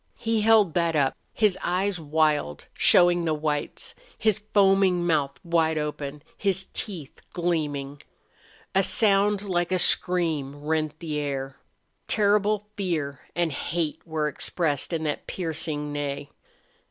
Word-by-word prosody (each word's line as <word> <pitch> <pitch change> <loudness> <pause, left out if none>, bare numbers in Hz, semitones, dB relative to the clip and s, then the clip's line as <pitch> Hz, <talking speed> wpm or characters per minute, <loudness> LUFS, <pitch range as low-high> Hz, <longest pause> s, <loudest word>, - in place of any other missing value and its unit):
He 225 -1 0
held 215 -5 +4
that 170 -2 +1
up, 140 -3 +2 0.2
his 210 -4 +1
eyes 185 +1 0
wild, 150 - 0
showing 175 -1 +4
the 160 -2 0
whites, 150 -1 -3 0.2
his 215 -2 +1
foaming 195 -3 +3
mouth 145 -5 0
wide 165 -2 +2
open, 150 -1 -4
his 190 -2 0
teeth 175 -10 -5
gleaming. 145 -5 -2 0.7
A 195 - +4
sound 205 -1 +2
like 175 -3 -1
a 185 - +2
scream 165 -6 +2
rent 155 0 -1
the 155 -3 -4
air. 135 -2 -4 0.5
Terrible 210 0 +2
fear 155 -8 -2 0.2
and 170 -1 +1
hate 160 +2 -3
were 160 -2 -2
expressed 150 0 -1
in 165 -2 -2
that 150 -2 -3
piercing 155 -4 -3
neigh. 145 0 -4
165 Hz, 130 wpm, -25 LUFS, 150-190 Hz, 0.7 s, held